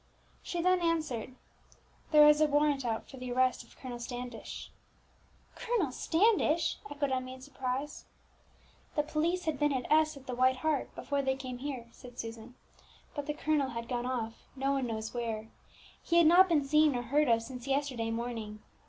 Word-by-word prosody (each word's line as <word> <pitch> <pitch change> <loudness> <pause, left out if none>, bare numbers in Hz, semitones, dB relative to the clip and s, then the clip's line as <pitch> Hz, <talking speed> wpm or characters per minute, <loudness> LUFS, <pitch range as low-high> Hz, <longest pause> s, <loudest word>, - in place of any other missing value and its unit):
She 345 -1 -3
then 365 0 +3
answered, 310 -8 -1 0.7
"There 300 -1 +8
is 300 0 +6
a 310 - +6
warrant 290 -1 +2
out 225 -2 -2
for 270 - -11
the 250 -1 -6
arrest 255 +1 +2
of - - -20
Colonel 245 -2 -7
Standish." 245 -1 -7 0.8
"Colonel 455 - -1
Standish!" 335 - +2
echoed 285 -1 -2
Emmie 255 0 -2
in 260 - -14
surprise. 270 +1 -4 0.9
"The 295 - +2
police 330 +4 -1
had 310 -4 -1
been 295 0 +3
at 260 -2 -1
S, 310 -1 +4
at 270 - -14
the 255 - -4
White 255 +1 +3
Hart, 305 -4 0
before 280 -1 -1
they 265 -1 0
came 255 -2 -6
here," 260 -4 -5
said 245 -1 -13
Susan; 230 +1 -7 0.6
"but 290 -1 -5
the 295 - -2
colonel 300 -3 +1
had 235 -1 -5
gone 245 0 -2
off, 230 -3 -4
no 270 +1 0
one 270 -2 0
knows 220 -1 -4
where. 225 -2 -3 0.5
He 340 - +1
had 340 - +7
not 360 +4 +7
been 300 -4 +3
seen 300 0 +4
or 245 - -1
heard 290 +5 +2
of 230 -1 +3
since 250 +1 -8
yesterday 270 -5 0
morning. 225 -2 -4
265 Hz, 180 wpm, -31 LUFS, 245-300 Hz, 0.9 s, There